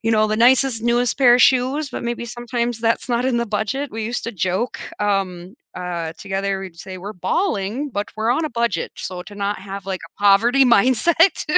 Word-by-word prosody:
you 225 - +1
know, 215 -1 +3
the 215 0 -1
nicest, 245 0 +3
newest 240 +1 +1
pair 250 -3 +6
of - - +1
shoes, 265 +4 +3
but - - -5
maybe 235 0 -3
sometimes 240 0 -3
that's 230 +2 0
not 240 +1 0
in 255 -2 +1
the 235 - -1
budget, 220 +7 -2
we 220 0 -4
used 235 +2 -3
to 230 - -4
joke, 190 +5 -2 0.2
um, 195 -2 -1 0.2
uh, 170 -2 -4
together, 195 -1 -2
we'd 185 -3 -9
say 185 +2 -8
"We're 200 +4 -7
balling, 240 - -1
but 205 -3 -3
we're 220 +2 0
on 315 +6 +1
a - - -7
budget." 235 -7 -1
So, 180 -1 -6
to 205 - -11
not 200 0 -2
have, 195 0 -7
like, 190 -1 -3
a - - -26
poverty 230 +7 +5
mindset. 260 - +3
225 Hz, 205 wpm, -21 LUFS, 195-245 Hz, 0.2 s, pair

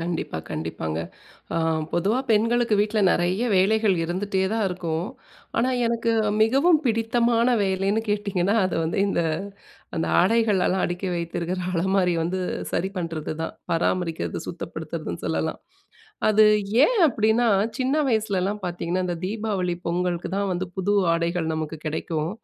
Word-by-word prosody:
கண்டிப்பா 165 - -3
கண்டிப்பாங்க. 80 0 -3 0.6
அ - - 0 0.4
பொதுவா 200 +8 +1
பெண்களுக்கு 230 +1 +3
வீட்டில 215 +1 +1
நிறைய 180 +7 +1
வேலைகள் 210 +1 +3
இருந்துட்டேதான் 190 +4 -1
இருக்கும். 175 -1 -3 0.5
ஆனா 250 +3 +2 0.2
எனக்கு 230 0 0 0.3
மிகவும் 280 +9 +4
பிடித்தமான 235 0 +2 0.2
வேலைன்னு 195 +3 0
கேட்டிங்கன்னா, 200 -2 0
அது - - -3
வந்து 165 - -2
இந்த 185 - +1 0.7
அந்த 160 - 0
ஆடைகள்லாம் 195 -2 +2
அடுக்கி 175 +2 -3
வைத்திருக்கிற 170 +1 -3
அலமாரி 185 +1 +2
வந்து 180 +3 -2 0.3
சரி 190 - 0
பண்ணுறதுதான், 165 -2 -4 0.2
பராமரிக்கிறது, 165 0 -1
சுத்தப்படுத்துறதுன்னு - - -6
சொல்லலாம். - - -1 0.7
அது 215 0 +6 0.4
ஏன் - - 0
அப்படின்னா 225 0 +2 0.3
சின்ன 260 +2 +1
வயசுலலாம் 210 -3 0
பார்த்திங்கன்னா, 175 +1 -2
இந்த 175 -1 -2
தீபாவளி 200 -4 -2
பொங்கலுக்கு 175 0 -1
தான் 200 -1 -1
வந்து 180 +1 -2
புது 200 +2 +1 0.2
ஆடைகள் 170 -1 -1
நமக்கு 155 0 -4
கிடைக்கும். 155 +1 -2
190 Hz, 120 wpm, -24 LUFS, 175-220 Hz, 0.7 s, அது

